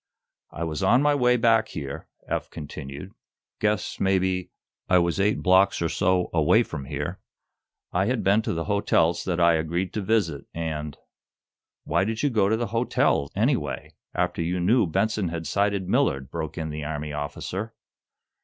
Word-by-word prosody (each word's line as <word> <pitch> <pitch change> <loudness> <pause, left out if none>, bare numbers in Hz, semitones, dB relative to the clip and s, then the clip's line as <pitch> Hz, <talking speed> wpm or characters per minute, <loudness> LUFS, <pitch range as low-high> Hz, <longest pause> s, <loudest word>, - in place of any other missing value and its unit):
"I 85 - -5
was 80 +1 -3
on 120 +8 +4
my 145 0 +4
way 125 -3 +3
back 115 -1 +3
here," 70 -1 -6 0.2
Eph - - -2
continued. 75 +3 -8 0.5
"Guess, 105 -1 -1
maybe, 95 -2 +1 0.4
I 90 - +6
was 85 0 +1
eight 105 +2 +1
blocks 95 +1 +4
or 85 - 0
so 90 +1 +1
away 80 -3 +4
from 70 - -7
here. - - -4 0.7
I - - +2
had - - 0
been 100 +3 +4
to - - -2
the 80 -1 -2
hotels 85 -4 +2
that 90 -2 -1
I 85 -1 +5
agreed 85 +3 -1
to 105 - -2
visit, 95 -9 0
and 75 -3 -4 0.4
" - - -68
"Why 85 - +1
did 110 +4 -2
you 145 - +2
go 105 -4 +2
to 110 - +2
the 120 - -1
hotel, 115 - +1
anyway, - - -1 0.2
after - - 0
you 90 +2 -1
knew 105 +4 +3
Benson 110 +3 0
had 85 0 -4
sighted 100 +3 0
Millard?" 65 0 +1
broke 80 -1 -5
in 80 -2 -3
the 75 0 -5
Army 75 0 -4
officer. 90 +8 -5
90 Hz, 175 wpm, -25 LUFS, 80-105 Hz, 0.7 s, I